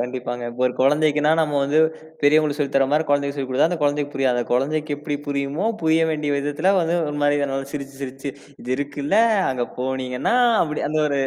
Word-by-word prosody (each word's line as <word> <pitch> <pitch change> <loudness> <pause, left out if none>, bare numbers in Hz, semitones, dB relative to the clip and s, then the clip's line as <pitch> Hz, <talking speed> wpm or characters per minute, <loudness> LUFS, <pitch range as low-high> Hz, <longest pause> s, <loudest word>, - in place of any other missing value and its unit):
கண்டிப்பாங்க. 125 0 -4
இப்போ, 125 +2 -4
ஒரு 125 - -1
குழந்தைக்குன்னா, 150 +2 +3
நம்ம 150 -2 0
வந்து 145 +3 +1 0.4
பெரியவங்களுக்கு 150 0 +3
சொல்லித் 140 -1 -2
தர்ற 135 - +4
மாரி 155 +1 +2
குழந்தைக்குச் 140 0 +1
சொல்லித் 135 -2 -4
குடுத்தா, 130 +4 +3
அந்தக் 175 -4 -3
குழந்தைக்குப் 145 0 0
புரியாது. 130 -2 +1
அந்தக் 120 - -3
குழந்தைக்கு 150 +3 -1
எப்பிடி 145 0 -4
புரியுமோ, 140 +5 -2 0.2
புரிய 160 0 +3
வேண்டிய 150 -1 -2
விதத்துல 145 +6 0
வந்து 165 0 0
ஒரு 150 - -4
மாரி 145 0 +3
நல்லா 135 0 -3
சிரிச்சு, 140 -2 -6
சிரிச்சு, 135 +1 -5 0.3
"இது 125 - -10
இருக்குல்ல, 145 +4 -2 0.3
அங்க 125 -2 -1
போனீங்கன்னா" 130 - -2 0.3
அப்படி 150 -2 -3
அந்த 155 +1 -1
ஒரு 140 -1 -1
145 Hz, 190 wpm, -22 LUFS, 135-150 Hz, 0.4 s, தர்ற